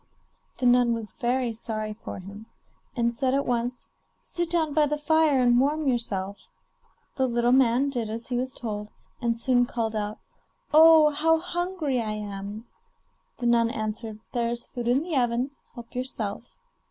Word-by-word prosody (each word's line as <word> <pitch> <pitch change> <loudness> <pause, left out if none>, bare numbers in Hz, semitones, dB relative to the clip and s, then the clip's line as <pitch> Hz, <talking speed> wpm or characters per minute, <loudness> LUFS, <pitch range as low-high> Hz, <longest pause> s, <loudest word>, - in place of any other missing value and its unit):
The 255 - -2
nun 245 -1 +4
was 220 -2 -6
very 245 -1 -1
sorry 215 -1 -3
for 215 - -8
him, 200 +4 -10 0.5
and 235 -1 +1
said 260 +2 0
at 280 - 0
once: 245 0 -2 0.4
'Sit 345 -1 -2
down 325 -3 +1
by 300 0 +4
the 300 +1 -1
fire 305 -1 +3
and 245 -1 +4
warm 295 +3 +1
yourself.' 205 -6 -2 0.7
The 265 -1 +2
little 240 0 +1
man 260 +1 +4
did 235 -5 -2
as 230 +3 -5
he 250 - -1
was 255 +1 -1
told, 210 -4 -5 0.3
and 235 -1 0
soon 245 -1 +2
called 225 -2 -2
out: 210 0 -2 0.6
'Oh! 315 -1 +8
how 325 +2 +3
hungry 350 -6 -2
I 215 -1 -2
am!' 205 +1 -6 0.7
The 245 - -5
nun 235 -1 +4
answered: 215 0 -4
'There 235 -2 0
is 235 0 -3
food 240 -2 -6
in 255 +5 +3
the 335 -2 -3
oven, 245 +1 +1 0.2
help 235 -2 -11
yourself. 240 -4 -3
240 Hz, 165 wpm, -26 LUFS, 225-275 Hz, 0.7 s, Oh